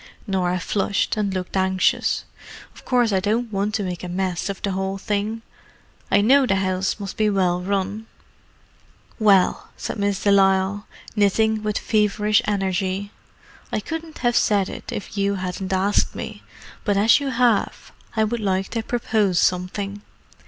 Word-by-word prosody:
Norah 180 -3 0
flushed, 200 +2 0
and 210 -2 -1
looked 185 0 -4
anxious. 190 0 +1 0.5
"Of - - -16
course 245 -3 +2
I 190 - +3
don't 220 +3 -1
want 200 +2 0
to 210 - -1
make 180 -2 -4
a 180 - -5
mess 185 +1 -2
of 200 - -4
the 200 - 0
whole 190 +1 -2
thing. 210 +2 -2 0.7
I 200 - +4
know 265 +5 +5
the 195 - +2
house 190 +1 -1
must 200 -2 -6
be 215 -1 +3
well 180 -3 +1
run." 200 +3 -2 1.1
"Well," 200 -4 +3
said - - -5
Miss 200 -1 0
de 200 - +4
Lisle, 195 +1 +3 0.3
knitting 215 +1 +2
with 210 0 -1
feverish 210 +1 +2
energy, 195 -1 -1 0.6
"I - - 0
couldn't 325 -1 -6
have 240 0 +3
said 200 -4 +2
it - - -8
if 205 0 -5
you 200 0 +1
hadn't 185 0 -4
asked 190 +2 +1
me, - - -6 0.4
but 205 -2 +1
as 220 +6 +5
you 280 -1 -2
have, 240 -4 +1 0.2
I 220 - +3
would 235 +2 -1
like 190 -2 -1
to 230 - -2
propose 220 -5 0
something. 195 +3 0
200 Hz, 160 wpm, -22 LUFS, 190-215 Hz, 1.1 s, know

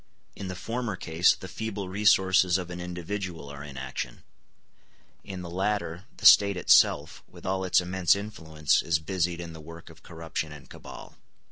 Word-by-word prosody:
In 100 - -6
the 95 - -5
former 115 +2 -3
case 85 0 +2
the 95 - -10
feeble 100 0 -5
resources 95 -2 +3
of 90 -1 -6
an 90 0 -6
individual 90 -2 -5
are 70 0 -9
in 70 -2 -10
action; 65 - -6 1.0
in 95 -2 -7
the 85 - -7
latter, 95 -2 -2
the - - -8
State 100 -2 +7
itself, - - +3
with - - -15
all 95 0 -1
its 95 - +3
immense 90 -1 +2
influence, 80 -8 -1
is 80 -1 +1
busied 85 +1 -2
in 85 -1 -7
the 80 - -10
work 85 +1 -12
of 80 - -18
corruption 80 -2 -5
and 75 -2 -12
cabal. - - -12
90 Hz, 170 wpm, -27 LUFS, 80-95 Hz, 1.0 s, State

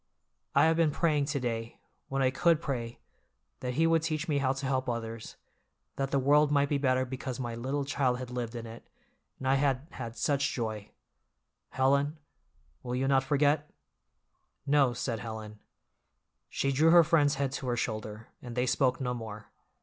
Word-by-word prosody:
I - - +6
have 160 0 +3
been 165 -2 +4
praying 150 -1 +1
to 145 0 -2
day, 115 -2 -3 0.3
when 135 0 0
I 130 - +3
could 165 +4 +3
pray, 120 -7 -4 0.6
that 125 -1 -4
He 160 +3 +3
would 165 -1 +3
teach 160 0 -2
me 145 -3 +1
how 130 -1 +2
to 135 +1 -4
help 130 -1 0
others, 115 -1 -5 0.6
that 135 -1 -2
the 140 - +1
world 145 +2 +4
might 140 -1 +3
be 145 - +1
better 130 -2 +2
because 130 0 -5
my 120 -2 -3
little 135 +5 -2
child 135 -3 +1
had 125 -1 -7
lived 120 -1 -4
in 115 -1 -5
it, 115 +1 -11 0.5
and 130 - -5
I 135 - +4
had 135 0 +1
had 115 0 -7
such 140 +2 +1
joy. 110 -3 -4 0.8
Helen, 140 +3 +1 0.7
you 125 - -8
will 125 +2 0
not 135 -1 +3
forget?" 145 +1 +2 1.0
"No," 140 -3 +3
said 120 -1 -3
Helen. 110 -1 -7 0.9
She 135 - 0
drew 155 +5 +4
her 170 0 +8
friend's 155 -3 +3
head 140 -1 -1
to 135 -1 -5
her 120 -1 0
shoulder, 110 -1 -4
and 120 -1 -8
they 125 0 +1
spoke 130 0 +1
no 125 -1 -1
more. 110 -3 -8
135 Hz, 180 wpm, -30 LUFS, 120-145 Hz, 1.0 s, her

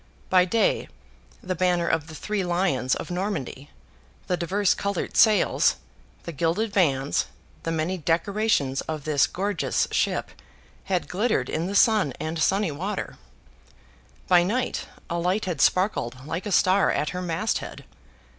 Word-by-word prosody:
By 185 -1 +6
day, 225 +4 +1 0.6
the 185 - -2
banner 180 -1 +1
of 160 -1 0
the 160 - -10
three 210 +3 -2
Lions 175 -8 +1
of - - -6
Normandy, 175 -7 -4 0.6
the 180 - 0
diverse 185 +3 +1
coloured 200 -2 -3
sails, 215 -4 +4 0.5
the 170 - -6
gilded 170 +8 -1
vanes, 145 -8 +1 0.3
the 165 - -3
many 165 +3 -1
decorations 165 -4 +1
of 155 -2 -3
this 150 -2 +2
gorgeous 195 -1 -1
ship, - - 0 0.6
had 185 -2 -1
glittered 195 - 0
in 165 +3 -1
the 200 - -4
sun 210 - +4
and 160 +2 -3
sunny 195 +2 +2
water; 190 +8 -4 1.1
by 180 -1 +6
night, 235 +8 -1 0.2
a 170 - -2
light 185 +5 0
had 170 -7 -2
sparkled 135 - +1
like 165 +6 -4
a - - -3
star 190 +1 +4
at 150 - 0
her 180 - -4
mast 180 +5 -1
head. - - -9
180 Hz, 145 wpm, -25 LUFS, 160-200 Hz, 1.1 s, By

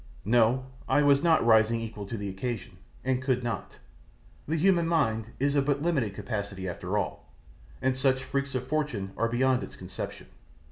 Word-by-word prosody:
No, 120 +3 +3 0.2
I 145 - +4
was 140 -1 +5
not 165 -6 +4
rising 110 0 +5
equal 110 -3 -6
to 115 - -4
the 100 -1 -4
occasion, 100 0 -4 0.3
and 130 0 0
could 130 -2 0
not. 120 -1 -4 0.7
The 160 - 0
human 170 0 +3
mind 115 -9 +1
is 140 +1 +1
of 140 -1 +2
but 145 0 +1
limited 135 - 0
capacity 100 -3 -4
after 90 +3 -3
all, 100 - -4 0.5
and 130 0 +2
such 130 0 +2
freaks 140 0 -2
of 130 0 -1
fortune 140 -10 -2
are 115 - +1
beyond 130 +2 +2
its - - -8
conception. - - -7
125 Hz, 175 wpm, -28 LUFS, 110-140 Hz, 0.7 s, was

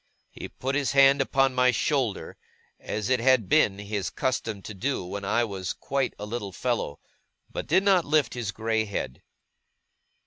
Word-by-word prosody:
He - - -8
put 135 +1 -4
his 140 -3 0
hand 140 0 +6
upon 135 0 +2
my 125 0 +4
shoulder, 125 -2 -1 0.4
as 105 -2 -4
it 130 - +3
had 125 -4 +3
been 95 +2 +3
his 100 -1 -3
custom 110 -6 -2
to 105 - -7
do 115 0 -2
when 100 +3 -6
I 110 +4 +1
was 95 -4 -4
quite 135 -1 -2
a 105 - -6
little 105 -2 -5
fellow, 120 - -2 0.5
but - - -5
did 190 - +3
not 190 -3 +4
lift 145 -5 +2
his 120 -5 -3
grey 110 +2 -1
head. 100 -10 -5
120 Hz, 170 wpm, -26 LUFS, 100-135 Hz, 0.5 s, hand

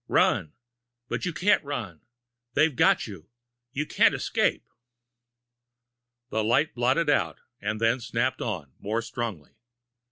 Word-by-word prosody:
Run 75 - +2 0.6
but - - -2
you 180 - 0
can't 185 +4 +3
run! 110 - -5 0.5
They've 155 -3 +3
got - - +4
you! 95 -6 -10 0.4
You 145 +3 -2
can't - - +4
escape! - - 0 1.6
The 110 -1 0
light 130 +8 +2
blotted 130 +7 +2
out, 145 - +2 0.2
and 105 +1 -2
then 115 +3 +2
snapped 120 +2 -1
on, 80 - -4
more 110 +3 -2
strongly. 110 -11 -5
115 Hz, 125 wpm, -27 LUFS, 105-140 Hz, 1.6 s, got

